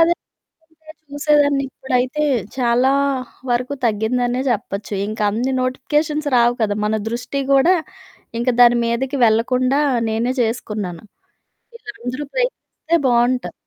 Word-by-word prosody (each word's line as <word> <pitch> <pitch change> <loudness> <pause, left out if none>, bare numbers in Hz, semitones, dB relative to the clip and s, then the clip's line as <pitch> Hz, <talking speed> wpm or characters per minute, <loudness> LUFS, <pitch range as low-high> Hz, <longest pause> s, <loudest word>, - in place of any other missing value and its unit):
అదే 335 +1 +5 0.7
పనిగా 315 - -10 0.2
చూసేదాన్ని. 290 -1 +2
ఇప్పుడైతే 255 +4 -1 0.3
చాలా 250 +2 +3 0.6
వరకు 250 +3 0
తగ్గిందనే 245 +3 0
చెప్పచ్చు. 210 -2 -3
ఇంకన్ని 215 +4 -1
నోటిఫికేషన్స్ 295 +4 -1
రావు 240 0 +4
కదా! 205 -1 0
మన 215 - 0 0.2
దృష్టీ 250 +4 -3
గూడా 275 +7 +5 0.7
ఇంక 245 - -1
దాని 240 0 +6
మీదకి 255 +4 -1
వెళ్ళకుండా 255 +5 +2 0.3
నేనే 235 +4 -1
చేసుకున్నాను. 210 -6 -3 0.7
ఇది 240 - -10
అందరూ 255 +4 -3
ప్రయత్నిస్తే - - -1
బావుంటారు. 245 +1 +1
250 Hz, 110 wpm, -19 LUFS, 230-275 Hz, 0.7 s, దాని